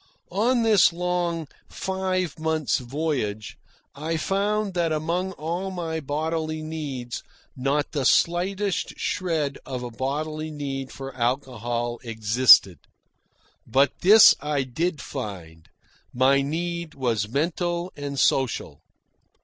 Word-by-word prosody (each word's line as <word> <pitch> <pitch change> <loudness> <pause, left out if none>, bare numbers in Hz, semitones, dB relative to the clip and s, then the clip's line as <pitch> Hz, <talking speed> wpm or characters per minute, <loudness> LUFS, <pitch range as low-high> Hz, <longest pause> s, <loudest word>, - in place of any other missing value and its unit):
On 230 +6 +2
this 215 -6 +5
long, 175 -2 -2 0.2
five 185 -3 -2
months' 160 -2 0
voyage, 125 -6 -3 0.3
I 160 +3 -3
found 200 +3 0
that 170 -2 0
among 170 +5 -1
all 175 +4 -3
my 165 -3 -3
bodily 155 +2 -2
needs 140 -7 -5 0.3
not 140 +3 0
the 145 -4 -1
slightest 185 +6 +1
shred 160 -6 -1
of 125 -2 -5
a 120 - -6
bodily 155 +5 -3
need 135 -3 -5
for 135 -1 -8
alcohol 120 -2 -2
existed. 110 - +5 0.9
But 135 +5 +2
this 210 +4 +9
I 145 -1 -1
did 150 +4 -2
find: 80 -9 -7 0.4
my 135 +2 +3
need 170 +3 -3
was 115 -6 -1
mental 170 +5 -1
and 140 -1 -4
social. 115 - +1
155 Hz, 110 wpm, -25 LUFS, 130-175 Hz, 0.9 s, this